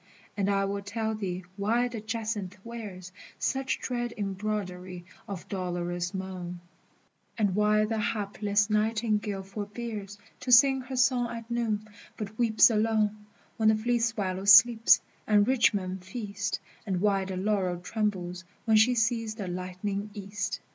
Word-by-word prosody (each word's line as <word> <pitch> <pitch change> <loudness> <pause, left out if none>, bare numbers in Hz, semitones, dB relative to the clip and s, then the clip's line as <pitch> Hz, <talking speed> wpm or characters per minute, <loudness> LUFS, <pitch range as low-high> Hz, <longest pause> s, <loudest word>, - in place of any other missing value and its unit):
And 200 -1 0
I 195 0 +2
will 200 +1 -2
tell 220 +2 -2
thee 190 -4 -4
why 230 +5 +2
the 235 -3 -6
jacinth 215 -3 -3
wears 205 -6 -8 0.3
Such 265 -1 -1
dread 240 -1 -3
embroidery 190 -3 -4 0.2
of 195 -4 -6
dolorous 175 -2 -3
moan, 185 -2 -5 0.8
And 205 -4 +2
why 210 +1 +3
the 220 0 -2
hapless 205 -2 0
nightingale 210 -2 0
forbears 205 +1 -6 0.2
To 255 - -3
sing 265 +2 +7
her 260 +1 -6
song 250 -2 +3
at 230 0 -7
noon, 220 -3 -1 0.3
but 210 -1 -6
weeps 230 0 +6
alone 215 -1 +1 0.3
When 220 -1 +4
the 220 - +5
fleet 240 +2 0
swallow 200 -5 -1
sleeps, 225 +3 +8 0.3
and 210 -1 +4
rich 255 -2 +4
men 190 -2 -3
feast, 200 +1 -4 0.3
And 185 -2 0
why 195 -1 +2
the 190 -1 -4
laurel 190 -2 0
trembles 185 -2 -2 0.2
when 220 -1 +5
she 240 +3 +5
sees 225 -1 0
the 205 -4 -5
lightening 185 +3 -4
east. 200 0 -4
210 Hz, 145 wpm, -28 LUFS, 195-225 Hz, 0.8 s, sleeps